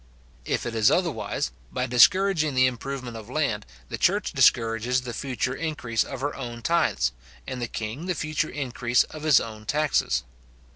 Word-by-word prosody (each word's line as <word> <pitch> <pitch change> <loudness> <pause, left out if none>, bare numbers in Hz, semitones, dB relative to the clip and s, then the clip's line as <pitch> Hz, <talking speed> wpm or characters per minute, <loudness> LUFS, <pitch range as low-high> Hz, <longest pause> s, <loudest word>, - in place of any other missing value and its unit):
If - - -1
it 120 - -3
is 110 -1 +4
otherwise, 115 - -1 0.2
by 125 - -1
discouraging 155 - +4
the 130 0 +5
improvement 130 -1 -3
of 110 0 -9
land, 125 -8 -1 0.2
the - - -5
church - - +2
discourages 115 +2 +3
the 125 -1 -6
future 130 -1 -2
increase 135 -7 -1
of 135 -2 -7
her 145 +1 -1
own 120 -3 -7
tithes, 165 - +2 0.3
and 130 -1 -5
the 120 - -1
king 115 +11 -5
the 180 - 0
future 155 0 -1
increase 125 -3 +1
of 155 - -10
his 155 -3 +5
own 110 -1 -8
taxes. 150 - +1
125 Hz, 165 wpm, -25 LUFS, 115-150 Hz, 0.3 s, the